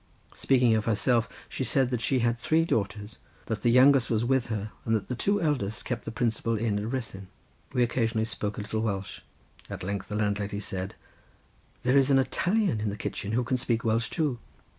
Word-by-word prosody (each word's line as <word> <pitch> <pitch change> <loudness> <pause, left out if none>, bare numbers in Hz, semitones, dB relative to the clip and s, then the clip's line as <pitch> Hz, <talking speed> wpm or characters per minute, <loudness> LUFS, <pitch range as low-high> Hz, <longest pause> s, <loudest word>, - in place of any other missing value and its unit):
Speaking 125 -4 +3
of 110 -1 0
herself, 115 +1 +2 0.2
she - - -4
said 130 -2 +2
that 125 -3 -2
she 130 - +1
had 120 0 +1
three 160 +5 +2
daughters, 105 -4 -2 0.3
that 110 -2 -3
the 120 - +3
youngest 130 +1 +6
was 115 0 +1
with 130 -1 +1
her 105 -2 -3
and 115 - +1
that 110 - -3
the 125 - -1
two 200 - +1
eldest 110 - -1
kept 120 -3 -3
the - - -4
principal 115 -1 0
inn 105 -2 0
at 110 +3 -4
Ruthyn. 105 -7 -5 0.4
We 125 - +2
occasionally 115 -2 0
spoke 105 -2 -3
a - - -3
little 105 +1 -3
Welsh. 100 -3 -3 0.5
At - - -6
length 100 +1 -3
the 105 - -5
landlady 105 -1 -1
said, 95 -2 -5 0.9
"There 125 +2 +3
is 135 0 +4
an 135 - +5
Italian 180 - +1
in 105 - 0
the 100 - -5
kitchen 100 +1 -4
who 125 +2 +2
can 125 +1 0
speak 120 -2 0
Welsh 115 0 +1
too. 150 -7 -1
115 Hz, 205 wpm, -28 LUFS, 105-125 Hz, 0.9 s, youngest